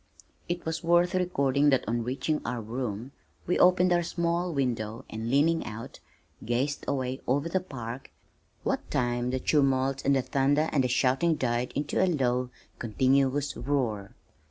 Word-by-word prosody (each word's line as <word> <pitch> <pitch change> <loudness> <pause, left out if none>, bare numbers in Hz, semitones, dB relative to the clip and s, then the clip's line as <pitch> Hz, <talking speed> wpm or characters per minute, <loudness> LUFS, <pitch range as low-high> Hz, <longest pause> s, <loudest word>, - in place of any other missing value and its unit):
It 175 0 -2
is 160 0 -3
worth 175 +2 +3
recording 145 -6 +2
that 135 -6 +2
on 115 +1 0
reaching 130 +5 -1
our 120 0 -3
room, 115 +1 -4 0.3
we 180 - 0
opened 180 0 +5
our 175 - +3
small 170 +1 -1
window 115 -6 -2
and 110 +1 -4
leaning 155 +5 +3
out, 110 +2 -8 0.4
gazed 125 +6 -1
away 130 -1 -2
over 140 +5 +1
the 185 +3 0
park, 130 -7 -7 0.5
what - - -2
time 120 0 0
the 130 +1 -1
tumult 135 -2 +1
and 140 0 +3
the 135 - +1
thunder 145 +4 +1
and 140 -3 +2
the - - +2
shouting 130 +6 +2
died 120 -2 -1
into 145 +5 0
a - - +3
low, 125 -6 0 0.3
continuous 135 +4 +1
roar. 120 -8 -2
135 Hz, 155 wpm, -28 LUFS, 125-155 Hz, 0.5 s, opened